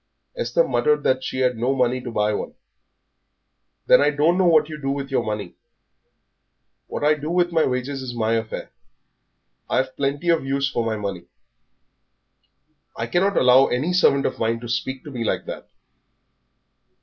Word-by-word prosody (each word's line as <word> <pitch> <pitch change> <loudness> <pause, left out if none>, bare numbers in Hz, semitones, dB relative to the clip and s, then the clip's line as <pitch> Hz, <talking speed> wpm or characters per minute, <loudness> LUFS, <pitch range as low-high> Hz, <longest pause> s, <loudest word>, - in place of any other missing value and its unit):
Esther - - +1
muttered 450 0 +1
that 130 0 +1
she 130 - -3
had 125 -1 +2
no 125 +4 0
money 125 0 +1
to 125 - -6
buy 105 -2 0
one. - - -5 1.3
"Then - - +6
I 145 - +4
don't 150 +4 +2
know 185 -1 +3
what 155 -3 +4
you 155 -1 -8
do 135 - -2
with 140 0 -3
your 130 - +1
money." 105 -4 -4 1.3
"What - - -5
I 150 +1 +5
do 150 +1 -5
with 175 0 +1
my 165 -2 +2
wages 130 +2 -3
is 130 -1 -5
my 115 -1 -1
affair; 115 -1 -4 1.0
I've 130 0 0
plenty 140 +5 -1
of 165 -3 +3
use 140 +1 0
for 120 -4 -2
my 115 -1 -1
money." 100 -4 -5 1.7
"I 115 - -3
cannot 190 +10 +1
allow 130 +1 +6
any 145 +9 -1
servant 140 -6 +3
of - - -2
mine 115 +1 0
to 120 - -7
speak 130 +3 -3
to 150 - -9
me 120 -3 -4
like - - -1
that." - - -8
135 Hz, 175 wpm, -22 LUFS, 120-150 Hz, 1.7 s, Then